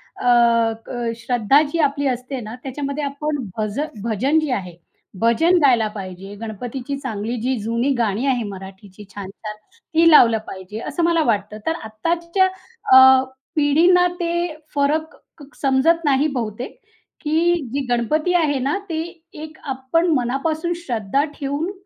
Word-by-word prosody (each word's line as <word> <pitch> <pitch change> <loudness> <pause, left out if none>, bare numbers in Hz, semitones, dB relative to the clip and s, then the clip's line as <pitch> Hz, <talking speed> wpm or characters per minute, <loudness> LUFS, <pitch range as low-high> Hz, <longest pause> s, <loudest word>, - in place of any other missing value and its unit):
अ, 235 -2 +3
क 240 -2 -3
श्रद्धा 245 +4 +3
जी 335 - -2
आपली 285 -1 +1
असते 255 +1 -3
ना, 220 +1 -7
त्याच्यामध्ये 280 +2 -4
आपण 290 +1 -2 0.2
भज 215 +4 -2 0.2
भजन 250 +8 +1
जे 310 -3 -2
आहे, 180 -7 -4 0.4
भजन 325 +11 +3
गायला 240 -6 +4
पाहिजे, 190 0 -8
गणपतीची 245 +5 -5
चांगली 235 -3 -4
जी 255 +2 0
जुनी 230 +5 -1
गाणी 225 +1 0
आहे 250 -4 +1
मराठीची 190 +1 -11
छान-छान 205 +2 -7 0.4
ती 330 +1 +5
लावलं 230 -6 +7
पाहिजे, 190 +3 -8
असं 345 - -2
मला 335 -1 +3
वाटतं. 210 -3 -1
तर 320 - 0
आत्ताच्या 335 - 0 0.5
अ, 260 0 +8 0.3
पिढींना 335 +5 +4
ते 340 -1 -1 0.4
फरक 310 +3 0 0.2
क 285 - -11 0.2
समजत 300 +5 +2
नाही 280 +1 +3
बहुतेक, 235 - -5 0.4
की 325 +2 +2 0.2
जी 280 -1 -1
गणपती 305 +9 +1
आहे 295 -5 +2
ना 275 +7 0
ती 320 -1 -1 0.3
एक 310 0 -9 0.2
आपण 265 +7 0
मनापासून 310 +7 -1
श्रद्धा 235 +3 0 0.2
ठेऊन 285 +6 -2
265 Hz, 140 wpm, -21 LUFS, 225-310 Hz, 0.5 s, अ